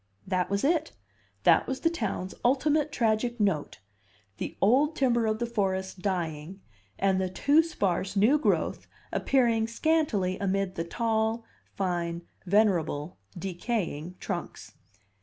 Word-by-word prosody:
That 185 Hz, -1 st, 0 dB
was 200 Hz, 0 st, -1 dB
it; 315 Hz, +2 st, +1 dB, 0.5 s
that -, -, +5 dB
was 265 Hz, 0 st, -3 dB
the 330 Hz, -, +3 dB
town's 195 Hz, -, -3 dB
ultimate 295 Hz, +4 st, +2 dB
tragic 235 Hz, +1 st, 0 dB
note: 180 Hz, -, 0 dB, 0.6 s
the -, -, -5 dB
old 275 Hz, +10 st, +3 dB
timber 240 Hz, -4 st, +2 dB
of 215 Hz, 0 st, 0 dB
the 240 Hz, -, -1 dB
forest 190 Hz, -5 st, -2 dB
dying 175 Hz, -2 st, -3 dB, 0.4 s
and 190 Hz, -1 st, +2 dB
the 185 Hz, -, -1 dB
too 285 Hz, -, +4 dB
sparse 195 Hz, -, -1 dB
new 225 Hz, +10 st, +4 dB
growth -, -, 0 dB, 0.2 s
appearing 235 Hz, -4 st, +2 dB
scantily 230 Hz, -, +1 dB
amid 195 Hz, -1 st, 0 dB
the 165 Hz, -2 st, -3 dB
tall, 225 Hz, +3 st, 0 dB, 0.3 s
fine, 175 Hz, -3 st, -2 dB, 0.2 s
venerable, 175 Hz, -, +1 dB, 0.2 s
decaying 180 Hz, -3 st, -3 dB
trunks. -, -, -5 dB
205 Hz, 125 wpm, -28 LUFS, 185-240 Hz, 0.6 s, that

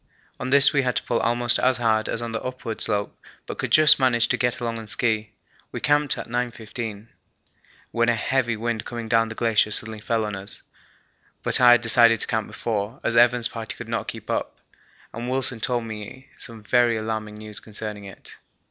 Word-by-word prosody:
On 125 Hz, -, -3 dB
this 140 Hz, +1 st, +6 dB
we 140 Hz, -, +3 dB
had 125 Hz, -2 st, -1 dB
to -, -, -1 dB
pull 115 Hz, -, 0 dB
almost 120 Hz, 0 st, +1 dB
as 130 Hz, 0 st, +3 dB
hard 110 Hz, -2 st, +1 dB
as 115 Hz, -, -2 dB
on 115 Hz, -, -4 dB
the 115 Hz, -, -3 dB
upward 125 Hz, -3 st, -6 dB
slope, 100 Hz, 0 st, -1 dB, 0.3 s
but -, -, -7 dB
could -, -, -2 dB
just 155 Hz, -2 st, +7 dB
manage 120 Hz, -3 st, +3 dB
to -, -, +2 dB
get 125 Hz, +1 st, 0 dB
along 115 Hz, -1 st, -3 dB
on 110 Hz, -, -9 dB
ski. 110 Hz, 0 st, 0 dB, 0.4 s
We -, -, -5 dB
camped 145 Hz, -1 st, +1 dB
at -, -, -6 dB
9.15, 115 Hz, -2 st, -5 dB, 0.8 s
when 115 Hz, 0 st, +2 dB
a 120 Hz, -, +3 dB
heavy 120 Hz, 0 st, 0 dB
wind 115 Hz, 0 st, -2 dB
coming 115 Hz, -1 st, -6 dB
down 115 Hz, 0 st, +2 dB
the 110 Hz, -, -7 dB
glacier 110 Hz, -2 st, +2 dB
suddenly 110 Hz, +1 st, -3 dB
fell 115 Hz, 0 st, 0 dB
on 105 Hz, -1 st, -4 dB
us; 95 Hz, -1 st, -10 dB, 0.8 s
but -, -, +1 dB
I 120 Hz, -1 st, +9 dB
had 120 Hz, -, +4 dB
decided 115 Hz, -1 st, +5 dB
to -, -, +1 dB
camp 110 Hz, -2 st, -2 dB
before, 110 Hz, +3 st, -3 dB
as 120 Hz, -, 0 dB
Evans' 120 Hz, 0 st, +4 dB
party 115 Hz, -1 st, -6 dB
could -, -, -9 dB
not -, -, -2 dB
keep -, -, -7 dB
up, -, -, -3 dB, 0.6 s
and 120 Hz, +2 st, -5 dB
Wilson 130 Hz, -2 st, 0 dB
told 120 Hz, +1 st, -1 dB
me 115 Hz, +4 st, -9 dB
some 115 Hz, -2 st, -9 dB
very 120 Hz, +1 st, +3 dB
alarming 110 Hz, -1 st, -4 dB
news 105 Hz, 0 st, -8 dB
concerning 105 Hz, -1 st, -7 dB
it. 95 Hz, -, -13 dB
115 Hz, 200 wpm, -24 LUFS, 110-120 Hz, 0.8 s, I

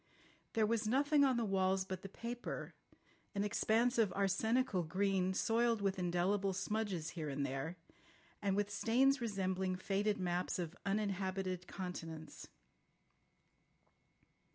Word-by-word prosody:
There 220 Hz, -1 st, +3 dB
was 225 Hz, 0 st, 0 dB
nothing 285 Hz, +4 st, +4 dB
on 260 Hz, -3 st, +4 dB
the 235 Hz, -, +1 dB
walls 190 Hz, -1 st, +2 dB
but 185 Hz, -1 st, -5 dB
the 195 Hz, -, -7 dB
paper, 235 Hz, +4 st, -5 dB, 0.6 s
an 200 Hz, -, +1 dB
expanse 230 Hz, +3 st, +2 dB
of 215 Hz, -4 st, +4 dB
arsenical 200 Hz, +2 st, +2 dB
green, 185 Hz, +2 st, +1 dB
soiled 230 Hz, +1 st, +2 dB
with 195 Hz, -1 st, 0 dB
indelible 185 Hz, +3 st, +1 dB
smudges 195 Hz, -5 st, -2 dB
here 155 Hz, -4 st, -4 dB
and 140 Hz, 0 st, -1 dB
there, 135 Hz, +5 st, -3 dB, 0.7 s
and 200 Hz, -2 st, +1 dB
with 205 Hz, 0 st, 0 dB
stains 260 Hz, +5 st, +3 dB
resembling 190 Hz, -4 st, -1 dB
faded 200 Hz, +3 st, 0 dB
maps 180 Hz, -1 st, -1 dB
of 175 Hz, -1 st, -4 dB
uninhabited 190 Hz, -2 st, -1 dB
continents. 165 Hz, -4 st, -6 dB
195 Hz, 125 wpm, -37 LUFS, 185-220 Hz, 0.7 s, nothing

